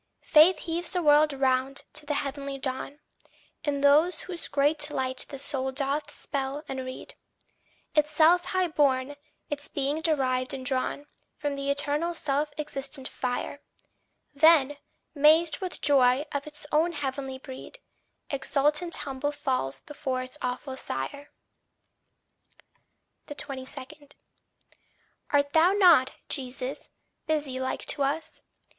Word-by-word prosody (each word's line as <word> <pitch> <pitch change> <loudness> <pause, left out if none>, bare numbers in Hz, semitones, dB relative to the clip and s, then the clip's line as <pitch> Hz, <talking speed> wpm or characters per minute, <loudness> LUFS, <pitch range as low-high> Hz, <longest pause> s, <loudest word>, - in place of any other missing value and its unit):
Faith 315 +5 +6
heaves 340 +1 -2
the 360 -3 -2
world 300 0 +5
round 265 0 0
to 300 -1 -6
the 295 - 0
heavenly 280 0 -3
dawn, 270 +2 -4 0.6
In 285 -2 -1
whose 330 +4 +3
great 295 +1 +3
light 260 -2 -1
the 275 - -7
soul 265 -1 -1
doth 280 +2 -2
spell 275 +1 -4
and 265 - -4
read 255 0 -8 0.8
Itself 315 +3 +4
high 370 -1 +1
born, 280 -2 +1 0.4
its 290 0 -3
being 285 +3 -1
derived 260 -5 +1
and 260 -1 -7
drawn 265 +2 -1 0.3
From 290 -1 -2
the 275 0 -3
eternal 290 +4 +1
self 295 -1 -1
existent 275 -2 -2
fire; 255 +3 -4 0.7
Then, 290 -1 +5 0.4
mazed 310 +1 +4
with 370 -2 -5
joy 270 -1 +4
of 285 +1 -3
its 295 -1 -10
own 325 +3 +2
heavenly 270 -2 -4
breed, 260 - -10 0.5
Exultant 295 +4 +1
humble 275 +1 -2
falls 255 - -2
before 265 -4 -4
its 255 +2 -8
awful 255 +2 -3
sire. 265 - -4 2.0
22. 285 0 -8 1.2
Art 285 0 +2
thou 335 +4 +5
not, 345 -10 +5
Jesus, 260 -1 -4 0.4
busy 295 -4 -1
like 260 0 -3
to 290 - -1
us? 285 +4 -2
285 Hz, 120 wpm, -27 LUFS, 265-305 Hz, 2.0 s, Faith